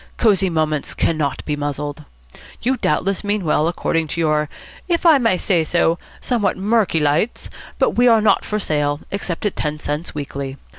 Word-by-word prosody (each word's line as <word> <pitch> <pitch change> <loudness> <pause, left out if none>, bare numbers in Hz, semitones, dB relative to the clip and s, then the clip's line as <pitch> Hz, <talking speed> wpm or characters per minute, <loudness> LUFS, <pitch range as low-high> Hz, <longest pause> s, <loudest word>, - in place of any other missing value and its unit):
Cosy 195 -4 +3
Moments 155 -3 -1
cannot 155 -4 -1
be 150 - -1
muzzled. 145 +1 -4 0.6
You 255 +3 +2
doubtless 195 +4 0
mean 205 -2 -1
well, 155 0 +2
according 165 -1 -1
to 160 - -4
your 155 -2 +1 0.4
if 345 -1 0
I 315 -4 +7
may 230 -7 +2
say 175 -2 +1
so 170 +1 +1 0.2
somewhat 230 -6 0
murky 205 -3 +2
lights, 150 +10 0 0.3
but - - +2
we 245 +1 +3
are 230 -2 +6
not 210 -2 +3
for 210 - -2
sale, 150 -6 0
except 195 -2 -3
at 205 - 0
ten 150 0 -2
cents 150 +2 -4
weekly. 140 -2 -5
165 Hz, 170 wpm, -20 LUFS, 150-205 Hz, 0.6 s, I